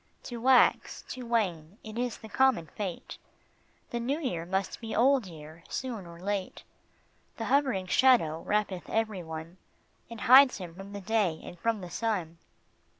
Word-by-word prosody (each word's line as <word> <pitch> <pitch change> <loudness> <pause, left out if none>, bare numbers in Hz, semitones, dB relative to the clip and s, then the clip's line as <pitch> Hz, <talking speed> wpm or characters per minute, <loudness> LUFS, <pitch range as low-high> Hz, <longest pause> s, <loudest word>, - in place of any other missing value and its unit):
To 240 - -6
wax, 255 0 +4
to 250 -2 -6
wane, 190 -6 -1
it 215 -1 -9
is 245 0 -2
the 220 - -11
common 220 -4 +2
fate, 185 +2 -6 0.7
The 240 - -2
new 270 +6 -1
year 175 - -3
must 190 +2 -2
be 225 -1 -5
old 255 -2 +3
year; 160 0 -12
soon 230 -8 -4
or 170 0 -12
late 195 0 -3 0.7
The 225 - -3
hovering 260 -8 +1
shadow 185 -8 +3
wrappeth 205 -3 -1
every 220 -4 -1
one, 160 +1 -8 0.5
And 230 -2 -9
hides 255 +1 +7
him 180 -4 -8
from 195 +3 -10
the 200 - -6
day 200 -6 0
and 175 - -10
from 225 +1 0
the 180 -1 -8
sun. 180 -8 -2
205 Hz, 160 wpm, -29 LUFS, 175-240 Hz, 0.7 s, hides